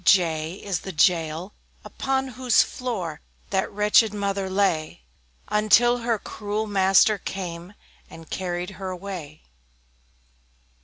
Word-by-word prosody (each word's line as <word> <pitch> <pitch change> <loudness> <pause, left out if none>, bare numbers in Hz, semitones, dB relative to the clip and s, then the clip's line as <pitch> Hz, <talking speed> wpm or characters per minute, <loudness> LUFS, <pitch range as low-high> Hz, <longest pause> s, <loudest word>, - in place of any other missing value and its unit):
J 165 -2 +2
J - - -12
is 195 -4 -1
the 190 - -7
Jail, 165 +2 +1 0.3
upon 265 0 -2
whose 250 -1 +3
floor 190 -12 -5 0.3
That 190 -1 0
wretched 210 +1 +3
mother 200 -1 -2
lay, 185 - 0 0.4
Until 235 +3 +4
her 230 -1 0
cruel 210 +1 -4
master 195 +1 +4
came, 180 0 -6 0.3
And 165 -1 -12
carried 180 0 -3
her 190 - -3
away. 180 -5 -7
195 Hz, 115 wpm, -24 LUFS, 175-210 Hz, 0.4 s, Until